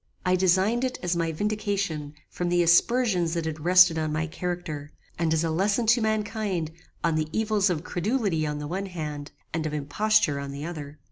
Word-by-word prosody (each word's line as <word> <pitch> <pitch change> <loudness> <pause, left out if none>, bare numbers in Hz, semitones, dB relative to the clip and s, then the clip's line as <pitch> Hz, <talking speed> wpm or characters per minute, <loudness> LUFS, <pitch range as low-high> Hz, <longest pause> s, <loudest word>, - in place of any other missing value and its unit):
I 180 0 +3
designed 190 +6 +2
it 255 -1 -1
as 175 0 0
my 165 -1 0
vindication 200 -5 -2
from 175 -1 -3
the 175 0 +3
aspersions 175 -1 +3
that 165 -1 -2
had 160 -1 -4
rested 180 -2 +6
on 155 -1 -1
my 155 +1 -1
character, 160 -3 -5 0.3
and 165 -2 +1
as 160 0 +2
a 165 - 0
lesson 200 +7 +1
to 240 - 0
mankind 210 -6 -1 0.3
on 170 - +2
the 155 0 -1
evils 215 -2 +1
of 165 -3 -1
credulity 195 -3 -1
on 150 0 -3
the 150 - -5
one 190 +5 -3
hand, 150 -5 -6 0.2
and 165 -1 -1
of 150 - -4
imposture 150 +2 +1
on 140 0 -5
the 140 +2 -6
other. 150 -3 -7
175 Hz, 195 wpm, -26 LUFS, 155-200 Hz, 0.3 s, rested